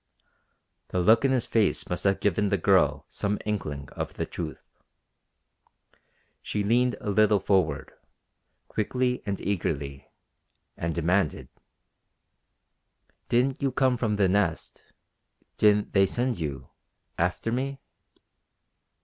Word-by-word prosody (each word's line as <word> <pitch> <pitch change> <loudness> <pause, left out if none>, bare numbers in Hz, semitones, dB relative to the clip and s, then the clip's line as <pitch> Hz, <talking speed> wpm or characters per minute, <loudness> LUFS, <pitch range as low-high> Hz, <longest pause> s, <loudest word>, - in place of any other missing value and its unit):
The 90 - -2
look 110 +7 +5
in - - +4
his 130 -3 +1
face 110 -3 +1
must 90 - -3
have 100 -1 +3
given 105 +1 +1
the 100 - +2
girl 85 - +3
some 100 +1 -2
inkling 75 -10 -3
of - - -5
the - - -2
truth. - - -7 1.8
She 105 - -2
leaned 120 +4 +2
a 105 - -3
little 105 0 +4
forward, 90 -7 0 0.7
quickly 125 +3 -1
and 100 -1 -2
eagerly, 70 -8 -3 0.7
and 85 -1 -3
demanded: 85 0 0 1.8
"Didn't 125 +4 +1
you 135 -1 +1
come 130 0 +2
from 115 -3 0
the 100 -2 +3
Nest? 90 -3 -1 0.8
Didn't 105 -1 +3
they 95 -1 +5
send 120 0 -1
you 70 -4 -5 0.5
after 90 +6 0
me?" 135 +3 -2
105 Hz, 115 wpm, -27 LUFS, 90-120 Hz, 1.8 s, look